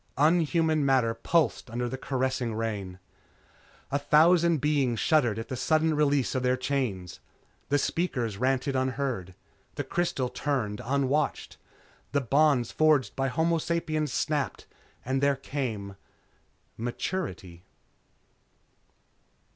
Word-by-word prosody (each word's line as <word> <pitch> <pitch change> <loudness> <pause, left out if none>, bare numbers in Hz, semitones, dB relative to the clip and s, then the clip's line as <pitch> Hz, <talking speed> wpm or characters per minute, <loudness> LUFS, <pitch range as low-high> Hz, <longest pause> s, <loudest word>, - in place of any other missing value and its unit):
Unhuman 160 0 +3
matter 130 -4 +2
pulsed 145 +2 0
under 120 +2 -2
the 125 - -4
caressing 130 -3 -2
rain. 105 -5 -4 0.9
A 140 - +1
thousand 165 +3 +4
beings 135 -5 +1
shuddered 125 -10 +2
at 115 - -5
the 130 - -4
sudden 155 +4 +2
release 145 -3 +2
of 130 - -1
their 125 0 +1
chains. 125 -9 -3 0.5
The 145 - +3
speakers 130 - -1
ranted 130 +3 0
unheard. 130 -8 -2 0.4
The - - -2
crystals 135 -8 -1
turned 125 -7 -2
unwatched. 140 +3 -1 0.6
The 140 - +2
bonds 140 -1 +2
forged 155 -4 +2
by 135 0 0
homo 165 +5 +1
sapiens 155 -3 -1
snapped 150 +1 -2 0.4
and 130 +2 0
there 140 0 +3
came 120 -8 -4 0.8
_Maturity. 115 - -4
135 Hz, 115 wpm, -28 LUFS, 120-150 Hz, 0.9 s, thousand